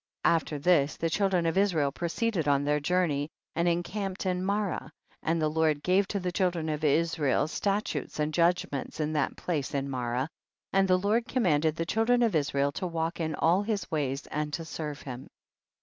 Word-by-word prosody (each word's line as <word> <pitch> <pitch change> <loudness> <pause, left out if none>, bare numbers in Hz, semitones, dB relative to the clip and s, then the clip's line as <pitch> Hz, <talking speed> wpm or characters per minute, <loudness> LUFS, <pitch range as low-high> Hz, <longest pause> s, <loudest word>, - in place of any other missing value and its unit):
45. - - +5
After 155 -2 -2
this 150 -2 +3
the 165 0 -1
children 190 -1 +2
of 165 - +1
Is 200 -3 +2
rael 145 -3 +2
proceeded 175 +2 -1
on 140 -1 +3
their 150 +1 +1
journey, 150 -2 0 0.3
and 170 +1 +1
encamped 185 +3 -2
in 180 -1 0
Marah, 200 0 -1 0.3
and 165 +1 0
the 155 - +2
Lord 155 -1 +1
gave 190 +2 +3
to 200 - -2
the 180 -1 -2
children 175 -3 0
of 155 0 -3
Israel 155 -2 +2
statutes 200 +5 -2
and 150 +1 0
judgments 170 -5 0
in 155 0 -1
that 150 -3 0
place 150 -6 -2
in 140 0 -1
Marah, 125 +1 -1 0.5
and 195 0 +4
the 185 -1 +4
Lord 215 +5 +1
commanded 160 - +2
the 165 - -2
chil 225 +6 +1
dren 245 +1 +4
of 225 -4 +2
Israel 140 -1 +1
to 185 +5 -3
walk 165 0 -2
in 160 -2 -1
all 175 +6 +3
his 205 -1 -3
ways 140 -3 -1
and 150 0 -3
to 165 - -3
serve 150 -3 -5
him. 130 -1 -8
165 Hz, 195 wpm, -29 LUFS, 150-185 Hz, 0.5 s, 45